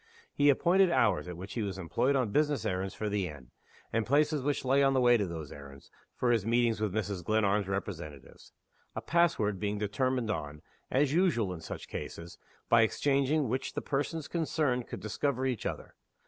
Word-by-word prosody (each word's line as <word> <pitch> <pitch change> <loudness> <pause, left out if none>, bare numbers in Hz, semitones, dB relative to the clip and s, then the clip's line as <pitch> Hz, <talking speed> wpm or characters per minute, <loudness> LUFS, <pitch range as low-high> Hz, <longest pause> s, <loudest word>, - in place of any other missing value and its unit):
He 145 0 +4
appointed 180 +7 +4
hours 105 - +2
at 90 -2 -6
which 95 +3 -8
he 115 - -2
was 100 -3 -3
employed 110 +10 0
on 125 -6 +1
business 150 +2 +1
errands 95 +1 -2
for 110 - -3
the 100 -3 -1
inn, 70 -6 -11 0.4
and 115 0 +2
places 150 +4 +2
which 140 0 -1
lay 135 +2 +3
on 135 -1 +3
the - - +4
way 120 -1 +5
to 105 -4 +1
those 80 -4 -7
errands, 70 -1 -12 0.2
for 125 - +1
his 115 -4 +2
meetings 115 0 +1
with 105 -2 0
Mrs. 100 -3 -3
Glenarm's 105 -1 +1
representatives: 85 -8 -6 0.4
a - - -3
pass 170 -1 +3
word 105 -3 -1
being 105 +1 -2
determined 115 +3 0
on, 75 -5 -5 0.3
as 140 +1 +2
usual 155 - +2
in 85 - -8
such - - -7
cases, 85 0 -7 0.3
by 115 - +5
exchanging 140 +4 +2
which 130 +4 -2
the - - -3
persons 145 +2 -2
concerned 150 -7 -1
could - - -7
discover 130 +4 -1
each 125 -5 -1
other. - - -6
115 Hz, 190 wpm, -30 LUFS, 95-140 Hz, 0.4 s, way